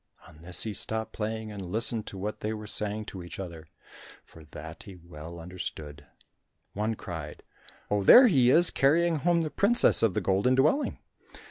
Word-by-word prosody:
On 80 -2 -17
this 90 +1 +1
he 110 - -4
stopped 110 +3 -3
playing 110 0 -5
and 100 -1 -8
listened 110 +4 0
to 95 - -8
what 105 +3 -5
they 105 +1 -3
were 110 -1 -8
saying 105 +1 -2
to 95 - -9
each 85 +2 -10
other, 85 -4 -8 0.6
for 80 -1 -17
that 80 +2 -11
he 100 - -10
well 85 -1 -11
understood. 80 -5 -8 0.7
One 110 +2 -2
cried, 80 -7 -8 0.5
"Oh, 105 0 +1
there 245 - +8
he 135 - +4
is 170 +6 +5
carrying 165 +4 +2
home 170 +3 +1
the 155 - -4
princess 225 +4 +3
of 110 -5 +1
the - - +1
Golden 100 +7 +1
Dwelling." 155 - +1
105 Hz, 175 wpm, -27 LUFS, 85-120 Hz, 0.7 s, there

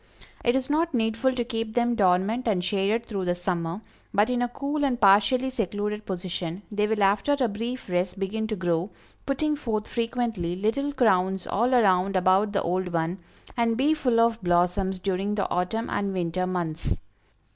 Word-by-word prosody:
It 240 +1 +3
is 265 -1 0
not 315 0 +1
needful 225 +3 +1
to 245 - 0
keep 225 -2 -4
them 240 0 +2
dormant 205 +3 +2
and 190 -5 +1
shaded 200 +5 0
through 195 -5 -3
the 175 0 +1
summer, 175 +1 -3 0.3
but 210 +4 +2
in 245 -1 0
a 245 - +2
cool 280 +4 -3
and 255 -4 +1
partially 210 +6 +4
secluded 210 -2 -3
position, 180 -1 -4
they 210 0 +1
will 215 -1 +1
after 205 +9 +2
a 250 - +3
brief 230 +4 -5
rest 180 +1 -1
begin 215 +3 -2
to 215 - -2
grow, 175 0 -1 0.4
putting 300 +2 +1
forth 220 -7 -3
frequently 230 -7 -2
little 230 +9 0
crowns 190 -8 +2
all 240 +5 +1
around 195 -4 +3
about 190 +3 +3
the 200 - 0
old 180 +2 -1
one, 170 +2 -1 0.4
and 230 -1 +1
be 285 +5 +3
full 250 -7 +1
of 230 0 +2
blossoms 180 +2 +1
during 195 +2 -1
the 200 - 0
autumn 200 +6 -1
and 200 -1 -2
winter 185 0 -1
months. 170 -3 -2
210 Hz, 180 wpm, -26 LUFS, 185-240 Hz, 0.4 s, partially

